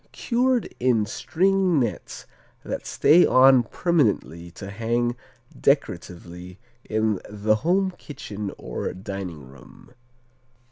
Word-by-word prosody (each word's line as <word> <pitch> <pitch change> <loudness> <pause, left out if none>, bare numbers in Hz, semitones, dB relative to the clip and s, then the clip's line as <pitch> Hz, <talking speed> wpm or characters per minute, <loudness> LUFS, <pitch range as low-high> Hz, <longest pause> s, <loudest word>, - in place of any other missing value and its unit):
Cured 250 0 0
in 120 -4 +2
string 185 - +1
nets 115 -8 -4 0.4
that - - -5
stay 165 +5 +5
on 130 0 +6
permanently 115 - 0
to 95 +3 -9
hang 120 +3 -1 0.4
decoratively 90 +1 -2 0.3
in 110 -2 0
the 105 +1 +1
home 185 - +1
kitchen 105 - -7
or - - -5
dining 95 - -7
room. 65 - -17
115 Hz, 100 wpm, -24 LUFS, 95-155 Hz, 0.4 s, on